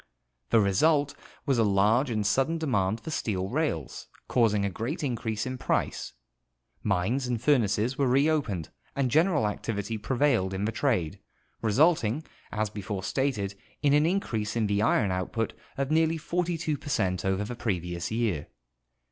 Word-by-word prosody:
The 115 - +5
result 145 +9 +3 0.3
was 135 -4 +2
a - - +5
large 105 +6 +3
and 110 -3 -1
sudden 135 +10 +2
demand 110 -9 0
for 160 - -6
steel 95 -9 -2
rails, 125 - -2 0.2
causing 105 -5 +2
a - - 0
great 120 - -4
increase 115 -5 -2
in 130 0 -4
price; - - -1 0.7
mines 105 +7 0
and 120 -2 -1
furnaces 120 -2 +2
were 140 - +3
reopened, 135 - +1 0.3
and 135 -3 0
general 160 - +3
activity 105 +1 -3
prevailed 120 -6 +1
in 100 +2 -1
the 110 - 0
trade, 110 - 0 0.4
resulting, 130 +3 +3 0.3
as 105 -1 -1
before 100 -2 -5
stated, 105 -3 -1 0.3
in 145 -1 +4
an 150 +2 +4
increase 115 - -1
in 115 -2 +1
the 100 0 +1
iron 105 -2 +2
output 95 +5 -2 0.2
of 140 +1 -1
nearly 160 +1 +3
42 165 -2 -1
per - - -8
cent 90 -9 0
over 95 +1 0
the 105 - -5
previous 90 -6 -3
year. 110 -10 -1
115 Hz, 155 wpm, -28 LUFS, 100-140 Hz, 0.7 s, The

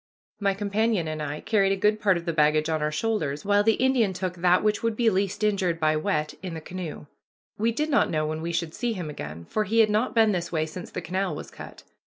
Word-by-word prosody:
My 200 -2 +1
companion 205 -2 0
and 155 0 -4
I 150 0 -4
carried 200 -3 +2
a - - +2
good 210 +2 +2
part 190 -3 +3
of 170 - -7
the 170 - -1
baggage 155 0 +3
on 160 -1 0
our 150 0 0
shoulders, 155 -4 -2
while 205 0 +3
the 225 +1 +4
Indian 250 -6 +2
took 185 0 -3
that 180 +1 +3
which 210 -1 +1
would 230 -1 0
be 230 -1 +3
least 200 +2 -1
injured 190 -5 +1
by 155 -1 +2
wet 155 0 -1
in 180 -3 -5
the - - -4
canoe. 170 -2 -7 0.5
We 225 +2 +2
did 300 +6 -2
not 280 - +3
know 155 -1 0
when 155 +1 -3
we 170 +1 -3
should 170 -1 -2
see 240 -2 -1
him 175 -7 -5
again, 80 - -7
for 215 - -1
he 215 +3 -1
had 220 -2 +5
not 220 +5 0
been 220 -2 +5
this 175 -3 -2
way 155 -2 0
since 175 +3 -8
the - - -5
canal 190 +3 -2
was - - -8
cut. - - -11
185 Hz, 255 wpm, -26 LUFS, 155-215 Hz, 0.5 s, had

